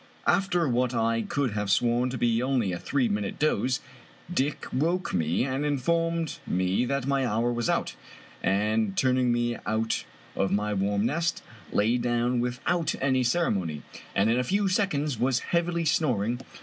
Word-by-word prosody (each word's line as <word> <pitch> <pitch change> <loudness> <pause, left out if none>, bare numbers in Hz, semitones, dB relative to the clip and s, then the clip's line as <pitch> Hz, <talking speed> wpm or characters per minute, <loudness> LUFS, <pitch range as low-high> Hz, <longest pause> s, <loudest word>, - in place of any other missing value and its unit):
After 185 -4 +2
what 125 0 +1
I 115 0 +1
could 135 +1 -1
have 105 -1 -2
sworn 120 +4 +2
to 125 - -4
be 115 -1 +2
only 125 -6 +1
a 90 - -3
three 135 -4 0
minute 100 -2 -2
doze, 135 -3 +1 0.5
Dick 145 -2 -1
woke 170 +8 0
me 85 +2 +1
and 135 +2 -2
informed 165 +3 0
me 95 +6 +1
that 140 0 -1
my 140 -1 +1
hour 120 0 0
was 120 -1 -1
out, - - 0 0.5
and 105 +1 +1
turning 130 -1 +3
me 120 0 0
out 110 +1 0 0.3
of 95 - 0
my 105 +1 0
warm 100 +1 0
nest, 165 +7 -1 0.3
lay 115 +4 +2
down 120 +1 +1
with 125 +1 -2
out 170 -3 +1
any 130 -1 +2
ceremony, 100 - 0 0.3
and 100 +2 +3
in 120 - +2
a - - +1
few 200 +9 +1
seconds 155 - 0
was 125 +1 +2 0.2
heavily 170 0 +1
snor 140 -10 +1
ing. 120 +2 -2
125 Hz, 170 wpm, -27 LUFS, 110-145 Hz, 0.5 s, turning